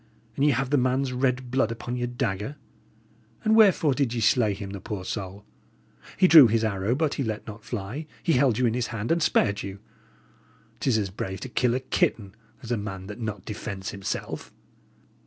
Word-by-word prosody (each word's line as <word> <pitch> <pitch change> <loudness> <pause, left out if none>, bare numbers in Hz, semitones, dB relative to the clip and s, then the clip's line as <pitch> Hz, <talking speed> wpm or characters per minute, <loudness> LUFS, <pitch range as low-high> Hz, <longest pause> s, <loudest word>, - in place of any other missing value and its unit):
And 140 - 0
ye 150 - +5
have 135 0 0
the 145 - +4
man's 130 +1 0
red 125 -1 0
blood 130 -3 +1
upon 120 +1 -5
your 120 0 -2
dagger! 120 0 -3 0.9
And 220 0 +3
wherefore 190 -9 +5
did 130 -3 0
ye - - -1
slay 110 -1 +3
him, 100 -1 -7
the 100 -1 -7
poor 95 -2 -5
soul? 100 0 -5 0.7
He 185 - +6
drew 155 -7 +10
his 115 +1 +1
arrow, 105 +2 0
but 150 0 0
he 140 - -2
let 110 -3 -4
not 105 0 -9
fly; 120 +8 -5 0.2
he 165 - +2
held 125 -4 +3
you 125 - +2
in 115 - +2
his 125 0 -1
hand, 115 +2 -3
and 170 0 +2
spared 100 -8 +2
you! 100 0 -6 1.0
'Tis 130 -5 +2
as 100 -3 -1
brave 95 0 -5
to 130 - -6
kill 120 0 +1
a - - 0
kitten, 105 -6 0 0.3
as 115 - -6
a 120 - +1
man 95 -2 -6
that 105 +4 -8
not 105 -5 -5
defends 100 -2 -5
himself." 100 -1 -5
115 Hz, 200 wpm, -26 LUFS, 105-130 Hz, 1.0 s, drew